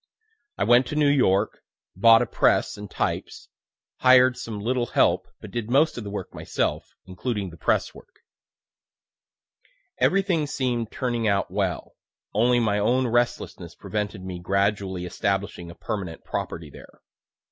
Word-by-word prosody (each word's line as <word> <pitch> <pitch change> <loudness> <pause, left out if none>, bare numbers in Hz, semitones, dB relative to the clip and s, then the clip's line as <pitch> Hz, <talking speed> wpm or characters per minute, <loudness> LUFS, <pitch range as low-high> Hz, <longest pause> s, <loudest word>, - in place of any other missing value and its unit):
I - - +1
went 120 +2 +5
to 150 - -4
New 150 -1 +3
York, 110 -7 +2 0.3
bought 115 +4 +6
a - - -2
press - - +2
and 105 -1 -9
types, - - -3 0.5
hired 130 0 +6
some 110 -4 -6
little 120 +3 -1
help, - - +2
but - - -10
did 120 -2 -4
most 145 +6 +3
of 120 - -5
the 100 - -6
work 100 -2 -6
myself, - - -3
including 95 0 -4
the 85 - -13
press - - 0
work. - - -17 1.8
Everything 185 -6 +2
seem'd 125 -5 -2
turning 120 -3 -1
out 100 -3 +1
well; 95 -3 -2 0.4
(only 120 +3 +3
my 105 -3 +1
own 125 +5 +2
restlessness 120 0 -1
prevented 105 -2 -4
me 90 -1 -6
gradually 100 0 -1
establishing 95 -1 -2
a 85 - -10
permanent 95 -7 -5
property 80 -3 -5
there.) - - -15
110 Hz, 145 wpm, -25 LUFS, 95-125 Hz, 1.8 s, bought